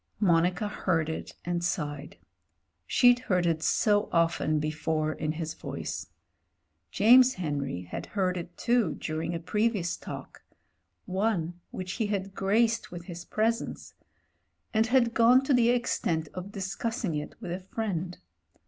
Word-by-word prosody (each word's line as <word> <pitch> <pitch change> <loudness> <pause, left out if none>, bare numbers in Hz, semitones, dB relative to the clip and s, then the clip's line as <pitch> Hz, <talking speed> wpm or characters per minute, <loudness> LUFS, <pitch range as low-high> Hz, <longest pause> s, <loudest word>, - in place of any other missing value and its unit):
Monica 180 0 +2
heard 165 -6 0
it 160 - -5
and 175 0 -1
sighed 150 -4 -3 0.4
— - - -49 0.3
she'd 245 0 +5
heard 185 -8 0
it 165 -2 +1
so 205 +4 +2
often 165 -2 +2
before 155 0 -1
in 155 0 -2
his 160 -1 -4
voice. - - -5 0.8
James 250 - +6
Henry 140 - -3
had 90 - -6
heard 185 -3 0
it 175 0 -7
too 235 -9 +2
during 165 +2 -3
a - - -2
previous 200 0 0
talk— - - -9 0.6
one 185 -3 -1
which 185 -1 -5
he 215 - +2
had 195 -2 -2
graced 220 +4 +1
with 175 -1 -7
his 175 -1 -8
pres 225 +2 +1
ence - - -8 0.4
— - - -47
^and 220 +1 +3
had 240 -1 +3
gone 240 +3 +6
to 270 - +2
the 240 -2 +4
extent 170 -10 0
of 185 +2 -6
discussing 205 +1 -3
it 150 0 -4
with 185 -6 -6
a 180 - -3
friend. 185 -3 -4
185 Hz, 150 wpm, -28 LUFS, 165-220 Hz, 0.8 s, James